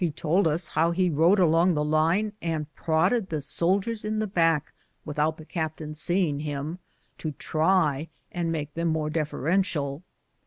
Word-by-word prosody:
He 175 Hz, -, +2 dB
told 165 Hz, +5 st, +1 dB
ns 155 Hz, +2 st, -1 dB
how 165 Hz, +1 st, +2 dB
he 180 Hz, +1 st, +1 dB
rode 165 Hz, +7 st, +4 dB
along 170 Hz, 0 st, +4 dB
the 150 Hz, -, +1 dB
line, 165 Hz, +8 st, +1 dB
and 155 Hz, -2 st, -3 dB
prodded 185 Hz, +7 st, +1 dB
the 155 Hz, -, -2 dB
soldiers 190 Hz, +9 st, +1 dB
in 215 Hz, 0 st, -2 dB
the 215 Hz, -, 0 dB
back, 165 Hz, -6 st, +1 dB, 0.3 s
without 150 Hz, +1 st, -1 dB
the 155 Hz, -, -11 dB
captain 155 Hz, -2 st, -4 dB
seeing 160 Hz, -1 st, +1 dB
him, 150 Hz, +3 st, -4 dB, 0.4 s
to 155 Hz, -2 st, -4 dB
try 160 Hz, -2 st, +1 dB, 0.2 s
and 170 Hz, -2 st, -2 dB
make 150 Hz, -2 st, -4 dB
them 170 Hz, +1 st, -1 dB
more 155 Hz, -1 st, -1 dB
deferential. 155 Hz, -1 st, -1 dB
160 Hz, 160 wpm, -26 LUFS, 150-180 Hz, 0.4 s, rode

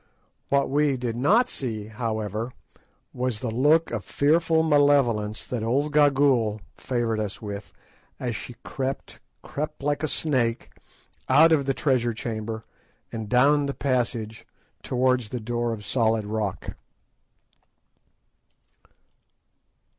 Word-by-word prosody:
What 140 Hz, 0 st, +2 dB
we 145 Hz, -1 st, +2 dB
did 120 Hz, -2 st, -3 dB
not 205 Hz, -, +3 dB
see, 115 Hz, -, -4 dB
however, 110 Hz, +1 st, -3 dB, 0.6 s
was 125 Hz, -3 st, -2 dB
the 120 Hz, -2 st, -3 dB
look 150 Hz, +8 st, +3 dB
of 110 Hz, -4 st, -3 dB
fearful 160 Hz, -, +2 dB
malevolence 140 Hz, -8 st, +2 dB
that 125 Hz, -3 st, -3 dB
old 135 Hz, +7 st, 0 dB
Gagool 135 Hz, -7 st, +3 dB, 0.2 s
favoured 120 Hz, -3 st, -1 dB
us 105 Hz, -2 st, -4 dB
with 100 Hz, -1 st, -7 dB, 0.5 s
as 120 Hz, -2 st, -2 dB
she 125 Hz, -, -7 dB
crept, 135 Hz, -3 st, -4 dB, 0.2 s
crept 150 Hz, 0 st, -5 dB
like 145 Hz, 0 st, 0 dB
a 155 Hz, -, 0 dB
snake, 130 Hz, -8 st, 0 dB, 0.6 s
out 155 Hz, +5 st, +6 dB
of 140 Hz, -4 st, +3 dB
the 135 Hz, -, +1 dB
treasure 120 Hz, -5 st, +1 dB
chamber 110 Hz, -1 st, -5 dB, 0.5 s
and 110 Hz, -2 st, -5 dB
down 140 Hz, +3 st, +4 dB
the 140 Hz, -, -3 dB
passage 120 Hz, -4 st, -2 dB, 0.3 s
towards 125 Hz, -3 st, +1 dB
the 125 Hz, -, -4 dB
door 120 Hz, +1 st, -2 dB
of 105 Hz, -2 st, -6 dB
solid 110 Hz, -3 st, +1 dB
rock. 105 Hz, -2 st, -3 dB
125 Hz, 120 wpm, -25 LUFS, 110-140 Hz, 0.6 s, out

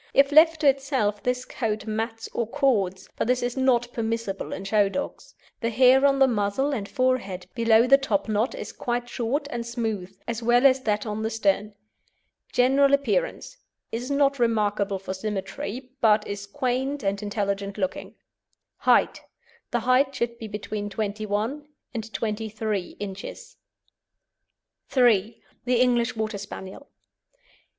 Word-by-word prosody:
If 275 Hz, +1 st, +5 dB
left 320 Hz, +1 st, +6 dB
to 295 Hz, -, +4 dB
itself, 265 Hz, -7 st, +1 dB
this 250 Hz, 0 st, -1 dB
coat 215 Hz, -3 st, -3 dB
mats 225 Hz, +1 st, -3 dB
or 235 Hz, -, -1 dB
cords, 215 Hz, -9 st, 0 dB
but -, -, -1 dB
this 250 Hz, 0 st, +1 dB
is 245 Hz, 0 st, -2 dB
not 245 Hz, -2 st, +2 dB
permissible 225 Hz, -3 st, -3 dB
in 190 Hz, -, -5 dB
show 200 Hz, 0 st, +2 dB
dogs. 280 Hz, +8 st, -6 dB, 0.2 s
The 230 Hz, -, -1 dB
hair 260 Hz, +4 st, +5 dB
on 275 Hz, 0 st, +2 dB
the 270 Hz, -1 st, +5 dB
muzzle 225 Hz, +4 st, 0 dB
and 205 Hz, -6 st, -4 dB
forehead 255 Hz, -9 st, 0 dB
below 230 Hz, -1 st, +4 dB
the 275 Hz, +2 st, +6 dB
topknot 220 Hz, -2 st, 0 dB
is -, -, -6 dB
quite 240 Hz, 0 st, -2 dB
short 245 Hz, +5 st, -2 dB
and 235 Hz, -1 st, -3 dB
smooth, 220 Hz, -6 st, -4 dB
as 235 Hz, 0 st, -3 dB
well 240 Hz, +3 st, +3 dB
as 265 Hz, -1 st, +5 dB
that 210 Hz, -3 st, 0 dB
on 215 Hz, 0 st, -3 dB
the 220 Hz, -, -1 dB
stern. 210 Hz, -1 st, 0 dB, 0.8 s
GENERAL 275 Hz, +3 st, +4 dB
APPEARANCE -, -, -2 dB, 0.3 s
Is 240 Hz, +3 st, -4 dB
not 280 Hz, -1 st, +2 dB
remarkable 210 Hz, -4 st, +1 dB
for 190 Hz, 0 st, -5 dB
symmetry, 210 Hz, +5 st, -5 dB
but 215 Hz, -1 st, +4 dB
is 200 Hz, 0 st, -5 dB
quaint 265 Hz, +3 st, -2 dB
and 200 Hz, +1 st, -1 dB
intelligent 200 Hz, -1 st, -2 dB
looking. 190 Hz, -3 st, -3 dB, 0.6 s
HEIGHT -, -, +3 dB, 0.5 s
The 240 Hz, -, 0 dB
height 255 Hz, +3 st, +3 dB
should 235 Hz, -1 st, -2 dB
be 225 Hz, -, -6 dB
between 210 Hz, 0 st, -5 dB
21 215 Hz, +7 st, -3 dB, 0.3 s
and 225 Hz, -2 st, -5 dB
23 215 Hz, -3 st, -3 dB
inches. 195 Hz, -1 st, -7 dB, 1.4 s
III. 225 Hz, -3 st, +3 dB, 0.2 s
THE 245 Hz, -1 st, +2 dB
ENGLISH 240 Hz, -2 st, +2 dB
WATER 215 Hz, -2 st, -3 dB
SPANIEL. 195 Hz, +6 st, -9 dB
230 Hz, 145 wpm, -25 LUFS, 205-255 Hz, 1.4 s, left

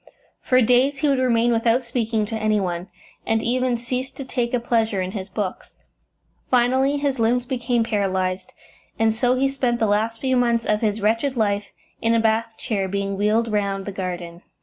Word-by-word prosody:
For 255 Hz, -1 st, +3 dB
days 250 Hz, +4 st, +3 dB
he 295 Hz, -, 0 dB
would 275 Hz, -2 st, +2 dB
remain 240 Hz, -2 st, +2 dB
without 230 Hz, +2 st, +2 dB
speaking 230 Hz, -3 st, -1 dB
to 225 Hz, -, -5 dB
any 215 Hz, -1 st, +1 dB
one, 180 Hz, -1 st, -3 dB, 0.4 s
and 225 Hz, 0 st, 0 dB
even 250 Hz, 0 st, +1 dB
ceased 250 Hz, +2 st, -4 dB
to 275 Hz, -, -6 dB
take 245 Hz, -2 st, -2 dB
a 250 Hz, -, +1 dB
pleasure 225 Hz, -4 st, 0 dB
in 185 Hz, 0 st, -2 dB
his 195 Hz, -1 st, -6 dB
books. 190 Hz, -1 st, -5 dB, 0.7 s
Finally 260 Hz, +3 st, +3 dB
his 280 Hz, -3 st, -1 dB
limbs 240 Hz, +2 st, +2 dB
became 245 Hz, -2 st, 0 dB
paralysed, 190 Hz, -4 st, -1 dB, 0.5 s
and 220 Hz, 0 st, +2 dB
so 245 Hz, +2 st, +2 dB
he 270 Hz, +1 st, +2 dB
spent 260 Hz, -3 st, 0 dB
the 225 Hz, -, +2 dB
last 220 Hz, +2 st, 0 dB
few 260 Hz, 0 st, 0 dB
months 235 Hz, -2 st, +2 dB
of 210 Hz, 0 st, +1 dB
his 215 Hz, -1 st, 0 dB
wretched 230 Hz, +6 st, +1 dB
life 205 Hz, -2 st, 0 dB, 0.3 s
in 230 Hz, 0 st, +2 dB
a -, -, +3 dB
bath 225 Hz, 0 st, 0 dB
chair, 200 Hz, -4 st, -2 dB
being 200 Hz, +1 st, -2 dB
wheeled 215 Hz, +3 st, +1 dB
round 200 Hz, -2 st, -1 dB
the 200 Hz, -, -4 dB
garden. 175 Hz, -2 st, -5 dB
230 Hz, 190 wpm, -22 LUFS, 205-245 Hz, 0.7 s, For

